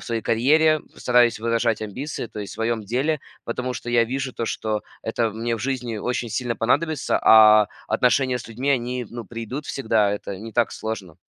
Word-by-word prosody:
своей 115 -1 -2
карьере 155 +7 +4 0.2
стараюсь 120 -2 +3
выражать 115 -1 +1
амбиции, 125 +6 -5
то 110 - -10
есть 100 -3 -6
в - - -9
своем 115 0 -1
деле, 135 +8 0 0.3
потому 125 +2 -3
что 120 - -7
я 120 -1 +4
вижу 130 +1 -3
то, 115 - -2
что 110 -1 -2 0.2
это 110 0 -1
мне 115 +2 -2
в - - -9
жизни 125 -2 -3
очень 120 +2 -2
сильно 115 +2 -2
понадобится, 150 +5 +1
а 110 -1 +7 0.2
отношения 130 0 +2
с 115 - -9
людьми, 125 +5 -4
они, 125 -2 -1
ну, 120 -1 -7
придут 120 +5 -6
всегда, 110 -5 +1
это 100 -1 -5
не 110 +3 -9
так 120 -1 +1
сложно. 100 -6 -6
115 Hz, 185 wpm, -23 LUFS, 110-125 Hz, 0.3 s, а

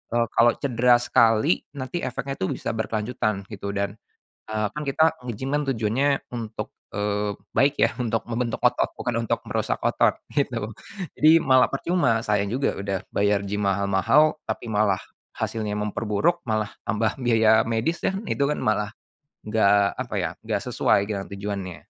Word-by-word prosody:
eee, 120 - +3
kalau 120 0 +5
cedera 125 -2 +3
sekali 115 +5 +3 0.2
nanti 140 +5 -4
efeknya 135 +2 -4
itu 95 - 0
bisa - - -3
berkelanjutan 110 -2 -2
gitu 100 -1 -5
dan, 100 +1 -2 0.5
eee, 110 -1 0
kan 150 - -4
kita 140 +3 +2 0.2
nge-gym 130 +5 -3
kan 150 - 0
tujuannya 115 +4 +1 0.3
untuk, 115 -2 -5 0.2
eee, 105 0 -1 0.2
baik 140 +1 +4
ya - - +4
untuk 115 -3 -1
membentuk 120 0 -2
otot - - +2
bukan 115 -1 -1
untuk - - -1
merusak - - -1
otot, - - +2 0.2
gitu. 120 -7 0 0.5
Jadi 155 - +6
malah 130 -4 +4
percuma 135 -6 +1
sayang 105 -2 0
juga 135 +3 0
udah 100 -1 -2
bayar 100 0 +1
gym 105 0 -2
mahal-mahal 100 - +3
tapi 120 - -4
malah 105 -3 +2 0.3
hasilnya 110 -2 -3
memperburuk, 105 +11 0
malah 110 -3 -1 0.2
tambah 110 +2 0
biaya 110 -3 +4
medis 115 +9 -1
dan 195 +1 0
itu 140 - +1
kan 150 - -1
malah 105 0 0 0.5
enggak 105 -2 +3
apa - - -4
ya - - -1 0.2
enggak - - -1
sesuai 100 - +2
dengan 100 -2 -3
tujuannya. 100 -3 -5
110 Hz, 155 wpm, -24 LUFS, 105-125 Hz, 0.5 s, Jadi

